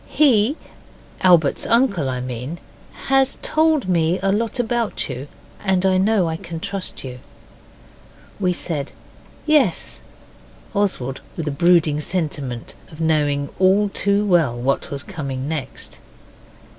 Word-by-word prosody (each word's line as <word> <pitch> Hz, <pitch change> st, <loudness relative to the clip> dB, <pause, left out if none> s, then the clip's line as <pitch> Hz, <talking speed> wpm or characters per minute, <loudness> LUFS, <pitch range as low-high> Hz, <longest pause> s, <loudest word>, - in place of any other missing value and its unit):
He, 265 Hz, -1 st, +3 dB, 0.6 s
Albert's 170 Hz, -6 st, +4 dB
uncle, 230 Hz, -, +2 dB
I 125 Hz, -1 st, -3 dB
mean, 125 Hz, +5 st, -5 dB, 0.5 s
has 270 Hz, -1 st, +3 dB
told 310 Hz, -7 st, +2 dB
me 170 Hz, -1 st, +2 dB
a 195 Hz, -, +3 dB
lot 225 Hz, +4 st, -1 dB
about 235 Hz, -2 st, -1 dB
you, 130 Hz, +4 st, -6 dB, 0.4 s
and 190 Hz, -2 st, +2 dB
I 190 Hz, -1 st, +4 dB
know 200 Hz, -2 st, +2 dB
I 160 Hz, 0 st, -2 dB
can 165 Hz, 0 st, -7 dB
trust 195 Hz, +1 st, -4 dB
you.' 125 Hz, -1 st, -7 dB, 1.2 s
We 185 Hz, -2 st, +2 dB
said 155 Hz, -5 st, -4 dB, 0.5 s
'Yes', 295 Hz, -, +2 dB, 0.7 s
Oswald 185 Hz, -, -1 dB, 0.2 s
with 160 Hz, -3 st, -3 dB
a -, -, 0 dB
brooding 160 Hz, 0 st, +3 dB
sentiment 145 Hz, -8 st, -3 dB, 0.2 s
of 155 Hz, -, -12 dB
knowing 145 Hz, -3 st, +1 dB
all 195 Hz, +2 st, +4 dB
too 200 Hz, +1 st, +1 dB
well 165 Hz, -11 st, +2 dB
what 135 Hz, +3 st, -1 dB
was 140 Hz, 0 st, -4 dB
coming 140 Hz, -7 st, -5 dB
next. 155 Hz, -3 st, -6 dB
175 Hz, 130 wpm, -21 LUFS, 145-205 Hz, 1.2 s, Albert's